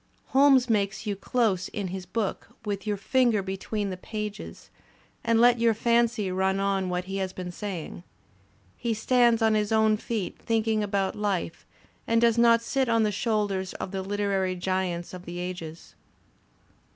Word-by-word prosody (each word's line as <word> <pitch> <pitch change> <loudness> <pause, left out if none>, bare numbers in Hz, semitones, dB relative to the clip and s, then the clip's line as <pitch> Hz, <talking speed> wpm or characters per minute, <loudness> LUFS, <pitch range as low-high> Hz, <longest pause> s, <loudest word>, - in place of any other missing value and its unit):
Holmes 270 -2 +5
makes 205 -2 0
you 210 - -1
dose 200 -2 0
his 190 -2 -5
book, 220 -4 -3 0.2
with 200 -1 -3
your 205 -1 0
finger 230 0 +2
between 195 +1 -3
the 185 - -5
pages, 210 +1 -7 0.5
and 230 -1 +2
let 240 0 +5
your 230 -1 +3
fancy 235 -3 +1
run 190 +1 +1
on 195 -1 0
what 180 0 -1
he 195 +1 -5
has 190 -1 -2
been 180 -1 -6
saying. 180 -4 -6 0.7
He 235 -2 -2
stands 235 0 +3
on 220 -1 +4
his 210 -1 0
own 220 -1 +4
feet 215 -3 -4
thinking 225 -1 0
about 195 -2 -1
life 200 -5 -2 0.4
and 230 0 +3
does 235 0 +3
not 230 0 +5
sit 265 +1 0
on 230 -1 +3
the 210 - +1
shoulders 205 -3 -1
of 185 - -5
the 195 -1 -3
literary 195 -1 -1
giants 180 -1 -2
of 180 0 -9
the 175 +1 -7
ages. 170 - -7
205 Hz, 165 wpm, -27 LUFS, 190-230 Hz, 0.7 s, Holmes